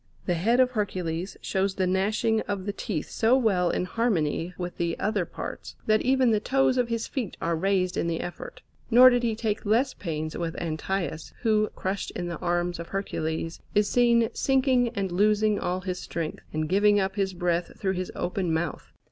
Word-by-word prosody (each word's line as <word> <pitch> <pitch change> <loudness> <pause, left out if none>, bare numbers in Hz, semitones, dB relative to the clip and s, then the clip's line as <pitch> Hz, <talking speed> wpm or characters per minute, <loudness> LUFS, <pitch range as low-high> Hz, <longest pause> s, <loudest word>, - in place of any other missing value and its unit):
The 180 - +1
head 220 +9 +2
of 255 -1 +4
Hercules 185 -5 -3
shows 190 0 0
the 190 - +1
gnashing 210 +4 +1
of 200 -2 -3
the 205 - -2
teeth 190 -7 -4
so 235 +3 +3
well 195 -8 +2
in 180 - 0
harmony 180 -7 0
with 175 -1 -5
the 170 -1 -1
other 205 -2 0
parts, - - -7
that 215 0 +3
even 260 -2 +3
the 215 - +3
toes 265 +3 +2
of 245 - +2
his 230 -1 -1
feet 240 -9 -4
are 170 - 0
raised 185 +1 +1
in - - 0
the 165 -1 -1
effort. - - -7 0.3
Nor 250 +2 +8
did 245 0 +2
he 230 -2 0
take 220 -2 -2
less 235 +6 +2
pains 155 -3 -4
with 165 -1 -3
Antaeus, 165 0 -3
who, 215 -2 +3
crushed 190 +1 -3
in 175 - -3
the 170 - -5
arms 175 0 -1
of 170 - -6
Hercules, 165 -4 -3 0.2
is 210 0 +4
seen 235 -2 +4
sinking 260 -2 +2
and 195 -3 -1
losing 210 +2 +3
all 180 +1 -2
his 180 -1 -4
strength, 165 -2 -4
and 155 0 -1
giving 205 +3 +4
up 195 0 -1
his 195 -2 -1
breath 175 -1 -1
through 190 -1 0
his 185 -1 -4
open 180 -1 -1
mouth. 160 0 -2
195 Hz, 195 wpm, -26 LUFS, 175-220 Hz, 0.3 s, Nor